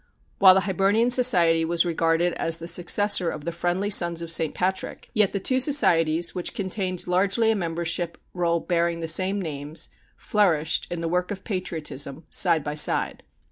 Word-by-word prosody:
While 190 -2 +7
the 190 - +2
Hibernian 195 +5 +1
Society 175 -10 +4
was 170 +1 +1
regarded 165 +1 0
as 165 0 -3
the 170 - -9
successor 180 +1 +2
of 150 -1 -7
the 170 - -3
Friendly 175 +4 -2
Sons 170 -3 +3
of 165 - -5
St. 160 -2 +1
Patrick, 190 +1 -4
yet 210 -4 +2
the 200 - -3
two 255 +7 +1
societies, 170 - +2
which 180 -2 -4
contained 185 -2 -2
largely 200 +5 +1
a - - 0
membership 170 -1 -3 0.2
roll 170 -1 0
bearing 170 -1 -1
the 165 - -4
same 185 +5 +2
names, 150 -3 -4 0.3
flourished, 175 -8 0
in 175 -1 -5
the 165 - -3
work 180 +2 -1
of 195 -2 -7
patriotism, 160 - -4
side 170 -5 +2
by 150 - -4
side. 150 - 0
175 Hz, 175 wpm, -24 LUFS, 165-195 Hz, 0.3 s, While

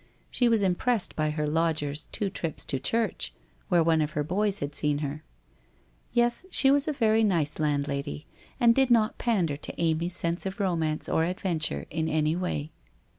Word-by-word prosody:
She 245 -2 +2
was 225 -3 +3
impressed 195 +4 0
by 155 -1 0
her 150 0 -2
lodger's 155 -2 0
two 200 -2 -2
trips 165 -4 -4
to 135 - -1
church, 225 - -1 0.3
where 175 -3 +4
one 160 -1 +3
of 150 0 -2
her 150 - 0
boys 200 +5 0
had 145 0 -4
seen 145 0 +1
her. 150 +3 -6 0.9
Yes, 240 +3 +1
she 270 -7 +4
was 285 +1 +3
a - - +1
very 225 -5 +2
nice 165 -9 +1
landlady 145 0 -2 0.3
and 235 -2 +6
did 265 +1 +3
not 225 -2 +3
pander 180 -11 0
to - - -8
Amy's 170 +1 0
sense 170 +2 -1
of 190 - -6
romance 165 -5 0
or 160 - +1
adventure 165 - -1
in 160 0 -1
any 155 0 +1
way. 165 -4 -3
165 Hz, 175 wpm, -27 LUFS, 150-215 Hz, 0.9 s, and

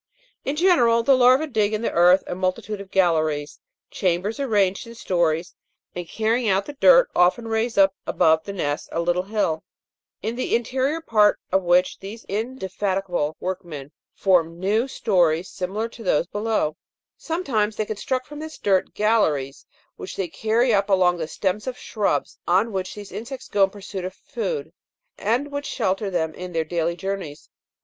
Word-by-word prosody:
In 275 - -2
general 245 -10 +4
the 270 +3 +5
larvae 255 +4 +5
dig 215 -7 0
in 215 - -4
the - - 0
earth 180 +2 +5
a - - -4
multitude 185 +3 -2
of 195 - -11
galleries, 155 -6 +1 0.3
chambers 185 +6 -1
arranged 205 -6 +1
in 230 - -10
stories, 175 -5 0 0.4
and, 175 -1 -6
carrying 225 +1 0
out 195 +1 +2
the 290 - -7
dirt, - - +6
often 185 +6 +3
raise 225 +1 -1
up 195 -1 +5
above 160 0 +3
the 200 - -6
nest 145 -7 -3
a - - -2
little 175 +1 +1
hill, 190 -5 -1 0.6
in 225 +2 -2
the 255 - 0
interior 265 +7 -1 0.5
of 190 - +3
which 180 +1 +2
these 210 +4 -9
indefatigable 195 - -2
workmen 170 -7 -5 0.2
form 170 -3 +2
new 215 +7 +1
stories 180 -9 +1
similar 200 +5 -3
to 230 - -13
those 180 -6 +1
below; 205 -6 -1 0.4
sometimes 245 -11 -1
they 215 - -1
construct 255 +5 -3
from 295 +2 -9
this 315 0 -7
dirt, 190 -2 +1
galleries 160 -11 +1 0.3
which - - -7
they 190 - -2
carry 225 +7 +1
up 200 0 +2
along 180 -2 +3
the 160 -2 -3
stems 195 +7 -2
of 255 -1 -3
shrubs 210 -3 -2
on 195 +6 +3
which 190 -2 -4
these 205 -2 -9
insects 255 +4 -7
go 200 -1 +4
in - - -8
pursuit 195 -1 -7
of 185 +1 -5
food, 185 -11 -4 0.5
and 250 +8 0
which 285 0 -4
shelter 200 -3 -1
them 160 -4 -1
in 180 +1 -8
their 165 -1 0
daily 170 +1 -1
journeys. 190 -6 -5
195 Hz, 170 wpm, -23 LUFS, 180-230 Hz, 0.6 s, dirt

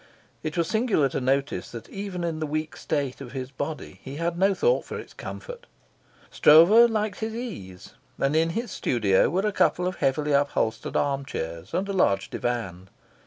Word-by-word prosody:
It 155 0 -4
was 170 -1 +1
singular 220 - +2
to 130 - -3
notice 135 +2 0
that 115 -1 -9
even 195 -3 -5
in 165 -2 -2
the 155 - -2
weak 155 +1 -3
state 140 -4 -2
of 125 -2 -9
his 130 -1 -5
body 145 +3 -6
he 135 +1 -8
had 170 +2 -1
no 195 +2 +3
thought 485 - +2
for - - -6
its - - -10
comfort. - - -8 0.6
Stroeve 195 +10 +7
liked 215 -2 -1
his 220 0 -3
ease, 100 - -7 0.2
and 135 +2 +1
in 165 +1 +3
his 230 -3 -3
studio 100 -6 +2
were 190 +4 0
a 210 - +1
couple 180 -2 +2
of 185 0 -2
heavily 145 +2 0
upholstered 140 -5 0
arm 140 -1 0
chairs 85 -8 -6
and 190 +2 0
a 200 - -3
large 100 - +1
divan. 95 -7 -3
155 Hz, 185 wpm, -26 LUFS, 130-195 Hz, 0.6 s, Stroeve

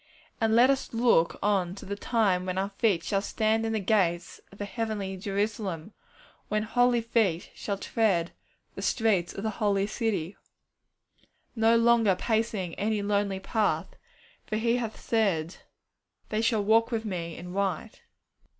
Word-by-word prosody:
And 225 -1 +2
let 250 +3 +6
us 270 -2 -3
look 230 -8 +3
on 190 -3 +1
to - - -10
the 200 - -4
time 200 -5 +1
when 185 0 -2
our 195 +1 0
feet 195 -4 +1
shall 195 +2 0
stand 220 +2 0
in 225 - -1
the 220 - 0
gates 185 -4 0
of 200 - -15
the 205 - -4
heavenly 205 -3 -3
Jerusalem, 200 -2 -3 0.5
when 210 0 0
holy 245 +1 +2
feet 220 -7 0
shall 200 -2 -4
tread 195 -5 0 0.4
the - - -7
streets 210 -7 +1
of 195 - -7
the 220 - -1
holy 200 -2 +2
city; 210 -5 -2 1.2
no 225 0 +4
longer 230 -4 +4
pacing 220 -5 -1
any 210 0 0
lonely 200 -1 0
path, 210 +2 -1 0.5
for 215 - -2
He 230 +2 +1
hath 230 -3 -4
said, 195 -7 0 0.7
'They 215 0 0
shall 225 -2 +1
walk 225 +2 +4
with 225 -2 -2
Me 170 -5 -4
in 180 +1 -8
white.' 200 +2 -2
210 Hz, 155 wpm, -28 LUFS, 190-225 Hz, 1.2 s, let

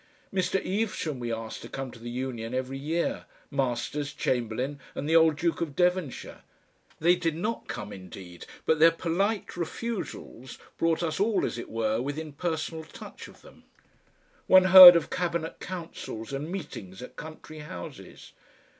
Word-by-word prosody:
Mr. 190 0 +1
Evesham 190 - -2
we 120 -1 -3
asked 115 0 -5
to - - -9
come 135 -2 -5
to 120 - -13
the 120 +1 -7
Union 120 -1 -4
every 130 +1 -3
year, 160 +4 -2 0.3
Masters, 140 +2 -2
Chamberlain 125 +3 -2 0.2
and 145 - -4
the 160 - +2
old 160 -1 +6
Duke 170 +3 -1
of 155 -4 -3
Devonshire; 180 -5 -1 0.6
they 175 +3 +4
did 165 -3 -1
not 215 +8 -3
come 105 0 -6
indeed, 90 -1 -11 0.2
but 160 -1 +2
their 165 +2 +8
polite 185 +6 -1
refusals 175 - -5 0.2
brought 165 +1 +1
us 160 0 -2
all, 205 0 +2
as 120 - -4
it - - -7
were, 110 0 0
within 145 +3 -5
personal 160 0 -3
touch - - -11
of - - -17
them. - - -17 0.8
One 185 0 +8
heard 185 -2 +14
of 170 - 0
cabinet 170 -2 -2
councils 165 -10 -7
and 145 +5 -4
meetings 125 - -7
at - - -11
country 155 0 -10
houses. 90 -13 -10
155 Hz, 155 wpm, -27 LUFS, 125-170 Hz, 0.8 s, heard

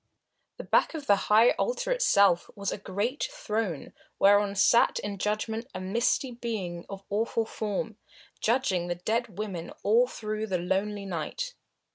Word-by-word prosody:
The - - -6
back - - +2
of 300 -3 -5
the 205 - +5
high 220 +3 +7
altar - - -1
itself 200 - +4
was 200 -2 -2
a - - -4
great 205 - -2
throne 215 - -3 0.2
whereon 200 0 +4
sat 235 +4 +4
in 200 -1 -4
judgment 220 +3 -2
a - - -3
misty 235 +7 0
being 210 -8 -5
of 195 0 -8
awful 225 +2 0
form, 215 0 -3 0.4
judging 215 -7 +1
the 175 - -1
dead 220 +3 -2
women 190 -6 -4
all 230 +5 +4
through 215 -2 -4
the 190 -3 0
lonely 195 +3 -1
night. 195 - -4
210 Hz, 150 wpm, -28 LUFS, 195-235 Hz, 0.4 s, high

